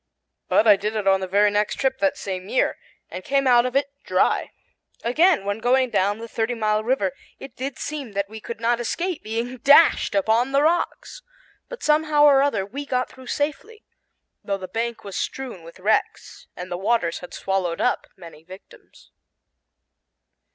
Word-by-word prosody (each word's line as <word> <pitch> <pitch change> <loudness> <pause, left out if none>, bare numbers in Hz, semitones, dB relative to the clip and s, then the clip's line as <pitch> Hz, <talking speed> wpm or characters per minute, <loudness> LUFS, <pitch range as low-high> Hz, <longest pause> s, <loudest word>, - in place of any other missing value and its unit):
But 220 - +3
I 210 -3 +7
did 210 +2 -3
it 210 -2 -2
on 195 0 +4
the 190 - -4
very 205 +2 +3
next 205 0 0
trip 265 -1 -1
that 195 -1 +1
same 190 0 -5
year, - - 0 0.3
and 185 - -7
came 275 +4 +1
out 245 -1 +5
of 250 - -7
it 280 0 0
dry. - - +1 0.5
Again, 305 - +3
when 200 +2 -2
going 255 +1 +2
down 200 +2 +1
the 230 +1 -8
Thirty 230 +1 -2
Mile 215 -1 0
River, 220 -6 0 0.3
it 270 - -11
did 265 +1 -5
seem 285 -7 -6
that 200 0 -1
we 220 +2 -9
could 230 0 -7
not 235 +1 +1
escape 340 +8 -3
being 230 +3 -4
dashed 285 -1 +5
upon 225 +6 +1
the 280 +1 +3
rocks. 345 +9 -1 0.5
But - - -9
somehow 300 -1 +3
or 280 -2 +6
other 225 -9 0
we 270 +9 -6
got 255 -2 -2
through 260 -1 -14
safely, 420 +10 -3 0.6
though 200 -1 -2
the 185 -1 -8
bank 230 +4 -4
was 200 -2 -8
strewn 255 -9 -5
with 165 +2 -14
wrecks 210 +4 -1
and 180 +1 -8
the 175 - -2
waters 190 -3 0
had 180 - -11
swallowed 185 -3 -2
up - - 0
many 165 -4 -13
victims. 185 +3 -16
230 Hz, 180 wpm, -23 LUFS, 200-270 Hz, 0.6 s, I